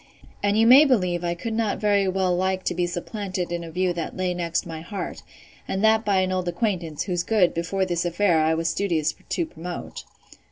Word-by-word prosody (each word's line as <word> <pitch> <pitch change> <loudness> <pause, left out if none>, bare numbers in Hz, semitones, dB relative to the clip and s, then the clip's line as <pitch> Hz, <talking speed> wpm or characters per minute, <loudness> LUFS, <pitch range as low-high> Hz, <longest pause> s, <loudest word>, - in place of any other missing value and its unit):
And 205 +1 +1
you 225 - +5
may 260 +5 +9
believe 180 - +1
I 170 0 -1
could 225 +6 -4
not 220 -2 0
very 205 -2 +2
well 185 -1 +1
like 190 +1 0
to - - -1
be 175 0 0
supplanted 185 0 -4
in 170 0 -3
a 165 - -7
view 180 +2 0
that 170 +1 -5
lay 185 -1 0
next 170 -1 -2
my 165 -2 -7
heart; 195 +4 -6 0.5
and 190 +2 -2
that 220 0 +4
by 200 -3 +2
an 185 0 0
old 185 -1 -1
acquaintance, 175 -4 -2
whose 180 -3 -1
good, 190 -2 +2
before 180 +3 -1
this 175 -2 -1
affair, 175 0 +2
I 160 +1 +2
was 165 0 -1
studious 165 -3 0 0.2
to 340 - 0
promote. 175 - -7
180 Hz, 210 wpm, -24 LUFS, 170-200 Hz, 0.5 s, may